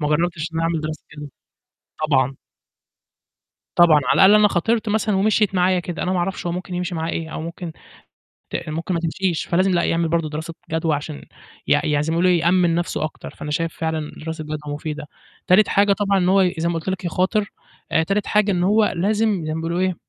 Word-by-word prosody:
ما 150 - 0
جرَّبتش 170 +1 0
إن - - -5
أنا - - 0
أعمل 165 -1 0
دراسة 155 -1 -5
جدوى. 150 -1 -7 0.8
طبعًا. 135 -2 +2 1.4
طبعًا. 165 -3 +6
على - - +2
الأقل 195 +2 +7
أنا 210 -1 +6
خاطرت 220 +5 0
مثلًا 210 -1 +1
ومِشيِت 210 0 +2
معايا 180 0 +3
كده، 175 0 -5
أنا 185 - -1
ما 185 - 0
أعرفش 175 +1 -2
هو 170 - -1
ممكن 180 +1 -5
يمشي 180 0 -3
معاه 165 0 -2
إيه 160 -1 -4
أو - - -4
ممكن 170 +1 -6 0.8
ت - - -4
ممكن 165 +4 -3
ما 170 - 0
تمشيش، 170 +1 -1
فلازم 185 +3 +2
لأ، 175 -1 +2
يعمل 165 0 +1
برضه 165 -1 0
دراسة 160 +3 -6 0.2
جدوى 160 -1 0
عشان 145 +1 -7 0.4
يع - - +3
يعني 145 -1 +1
زي 155 - -2
ما - - 0
يقولوا 180 +2 +3
يأمِّن 175 0 +3
نفْسه 170 -2 -1
أكتر. 155 - -6
فأنا 150 - -8
شايف 165 +2 -1
فعلًا 160 -2 -2
دراسة 160 -1 -5
جدوى 150 -1 -5
مفيدة. 150 0 -5 0.4
تالت 195 +4 +5
حاجة 200 0 +3
طبعًا 200 -1 +1
إن 180 -1 +1
هو 190 -1 +4
زَي 165 +1 0
ما 170 - -1
قُلت 165 +2 -4
لك 190 -1 -3
يخاطر، 185 +4 0 0.4
آآ 160 - +4
تالت 195 +5 -1
حاجة 210 -1 +2
إن 180 -2 +1
هو 210 +3 +4
لازم 205 0 0
زَي 155 - -2
ما 160 - -3
بيقولوا 170 +2 -2
إيه، 185 -1 +1
170 Hz, 215 wpm, -21 LUFS, 160-190 Hz, 1.4 s, الأقل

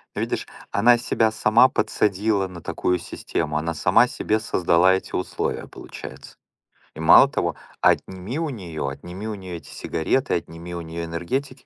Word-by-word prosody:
Видишь, - - -2 0.2
она 120 +4 +5
себя 115 -1 +1
сама 110 +3 +5
подсадила 100 -1 +1
на 90 -2 -10
такую 90 +2 -1
систему, 80 -2 -3
она 85 +2 -2
сама 105 +10 +4
себе 110 -2 -1
создала 90 -3 +3
эти 95 - -6
условия, 90 - -3
получается. 65 +1 -10 0.6
И - - -10
мало 80 - +8
того, - - -1 0.3
отними 95 - +1
у 165 -2 -1
неё 85 - -5
отними 90 +9 -7
у 110 - -3
неё 95 -3 -7
эти - - -14
сигареты, 125 - -1
отними 85 +1 -6
у 85 - -4
неё 85 +1 -5
энергетики, 130 +11 -4
95 Hz, 155 wpm, -23 LUFS, 85-110 Hz, 0.6 s, мало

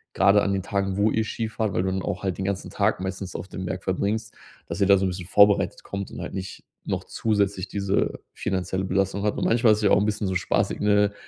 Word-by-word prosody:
gerade 100 +1 +5
an 100 - +1
den 95 - 0
Tagen, 100 -1 -1
wo 105 +2 +3
ihr 110 - +1
Ski 110 +1 -3
fahrt, 110 -2 -2
weil 90 - +1
du 95 - 0
dann 95 -1 -2
auch 90 - -3
halt 95 -2 -1
den 95 - -3
ganzen 100 0 -3
Tag - - +1
meistens 95 -1 -5
auf 95 - -7
dem 95 -1 -6
Berg 95 +1 -4
verbringst 105 +4 -1 0.3
dass - - -5
ihr 100 - +5
da 100 -1 +7
so 95 - 0
'n 95 - +1
bisschen 90 -1 -6
vorbereitet 100 +1 +4
kommt 100 0 -5
und - - -7
halt - - -6
nicht 95 0 -6 0.2
noch - - -2
zusätzlich 100 -3 0
diese 100 0 -1
finanzielle 95 0 -2
Belastung 95 +1 0
habt. 105 - 0
Und, - - -1
manchmal 115 0 +4
ist - - 0
es - - -4
ja - - +5
auch - - +6
'n 105 - +1
bisschen 105 -1 -1
so 95 - -1
spaßig, 90 - 0
ne? 105 0 +3
100 Hz, 260 wpm, -25 LUFS, 95-105 Hz, 0.3 s, da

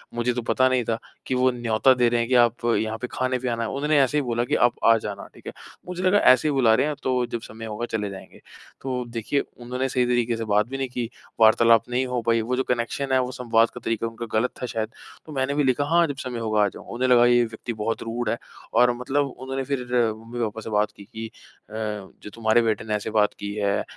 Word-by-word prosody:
मुझे 120 +1 0
तो 120 - -2
पता 130 +2 +2
नहीं 130 -1 +1
था 115 0 0 0.3
कि 130 - -1
वो 130 0 +3
न्योता 120 +1 +3
दे 125 -2 +3
रहे 120 0 +1
हैं 115 0 -1
कि, 130 - +3
"आप 120 -1 +3
यहाँ 110 0 -1
पे 125 - -3
खाने 130 0 -1
पे 125 0 -2
आना 115 0 -1
है", 115 - -2
उन्होंने 145 +2 +1
ऐसे 135 +2 +1
ही - - +3
बोला 120 -3 -1
कि, - - 0
"आप 120 - +3
आ 115 0 +7
जाना", 105 -2 -6
ठीक - - -15
है। - - -5 0.3
मुझे 180 0 -5
लगा 185 +2 +4 0.2
ऐसे 130 +4 0
ही - - +2
बुला 120 -5 +4
रहे - - +2
हैं, 150 - -2
तो 125 -1 +1
जब 120 -1 -5
समय 115 0 -9
होगा 110 +2 -4
चले 105 -2 -2
जाएँगे। 95 -1 -11 0.4
तो 130 -2 -2
देखिए 115 +4 -1 0.2
उन्होंने 125 +2 -2
सही 125 -1 +1
तरीके 120 -1 +1
से 115 - -4
बात 105 0 +2
भी 135 +2 -5
नहीं 135 -1 -2
की, 120 -2 -4 0.3
वार्तालाप 115 +1 +5
नहीं 125 +2 0
हो 125 -1 -2
पाई, 115 0 +3
वो 120 +3 -1
जो 130 - 0
कनेक्शन 125 +3 -2
है, 130 - +5
वो 125 0 -1
संवाद 115 -2 +2
का - - -10
तरीका 115 0 -1
उनका 115 +1 -6
ग़लत 125 +3 0
था - - -1
शायद। 110 -2 -3 0.4
तो 155 - -11
मैंने 135 0 0
भी 145 - +2
लिखा, 135 +2 +2
"हाँ, 170 +3 +4
जब 145 - -4
समय 125 -2 -4
होगा 110 -2 +1
आ - - +3
जाऊँगा"। - - -12
उन्हें 130 +2 0
लगा 120 -1 +6
ये 120 0 +5
व्यक्ति 115 +1 -6
बहुत 110 +1 -3
रूड 115 0 -3
है, 115 - 0 0.4
और 125 +2 +5
मतलब 135 +4 0 0.2
उन्होंने 135 0 -3
फिर 140 0 -2 0.4
मम्मी-पापा 115 -1 -4
से - - -7
बात 105 0 +1
की 100 - -12
कि 110 +2 -7 0.4
अ, 110 - -13 0.5
"जो - - -7
तुम्हारे 115 +1 +3
बेटे 110 -3 0
ने 110 - -2
ऐसे 105 - -3
बात 105 -1 +2
की 100 0 -4
है, 100 -1 0
120 Hz, 260 wpm, -24 LUFS, 110-130 Hz, 0.5 s, आ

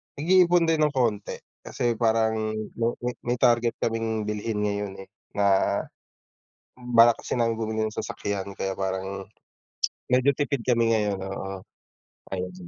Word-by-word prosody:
nag-iipon 175 +2 +4
din 165 -1 +2
ng 150 -2 +2
konti, 110 -5 0 0.2
kasi 120 -1 -2
parang 110 -1 +1 0.2
may 115 - +2 0.2
may 125 0 -1 0.2
may - - -9
target 120 -1 +3
kaming 115 -1 -1
bilhin 105 0 -2
ngayon 100 -1 -2
eh, 95 - -21 0.2
na, 100 -1 +2 0.9
balak 120 -2 +5
kasi - - -2
namin 115 -1 +2
bumili 110 -1 -1
ng 110 - -8
sasakyan 100 -1 -4
kaya 95 0 -3
parang, 95 +1 -3 0.8
medyo 130 +2 +4
tipid 140 -4 -1
kami 115 -2 +3
ngayon 105 -3 0
oo, 95 0 -5 0.7
ayun. 90 -1 -3
110 Hz, 135 wpm, -26 LUFS, 100-120 Hz, 0.9 s, balak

